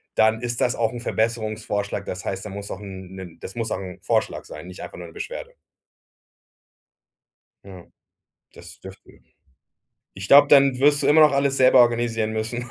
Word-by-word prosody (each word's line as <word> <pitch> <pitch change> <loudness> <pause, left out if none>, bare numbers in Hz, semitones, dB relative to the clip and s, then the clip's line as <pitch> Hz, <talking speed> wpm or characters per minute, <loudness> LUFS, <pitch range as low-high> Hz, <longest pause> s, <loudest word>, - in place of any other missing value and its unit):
dann 110 0 +3
ist 120 -1 -3
das 125 - +1
auch 115 0 -1
'n 120 - -7
Verbesserungsvorschlag. 110 -3 -2
Das 90 +1 -6
heißt, 95 +1 -5
dann 100 - -7
muss 100 0 -7
auch 95 - -6
'n 95 -2 -10
'nen 90 -3 -10
das 95 - -9
muss 115 -1 -3
auch - - -1
'n 90 -2 -9
Vorschlag - - -1
sein, 75 +4 -10
nicht 90 - -10
einfach - - -10
nur - - -9
'ne - - -15
Beschwerde.“ 485 +4 -7 2.1
Ja. 95 -3 -12 0.7
Das 85 -1 -14
dürften 95 0 -15 0.9
Ich 95 +1 -8
glaub, 140 +1 +7
dann 135 -3 +5
wirst 145 +1 +3
du - - +1
immer 155 +2 +6
noch 150 -2 +6
alles 140 0 +1
selber 130 -1 +6
organisieren 115 -2 +1
müssen 120 +2 -4
110 Hz, 180 wpm, -23 LUFS, 95-125 Hz, 2.1 s, glaub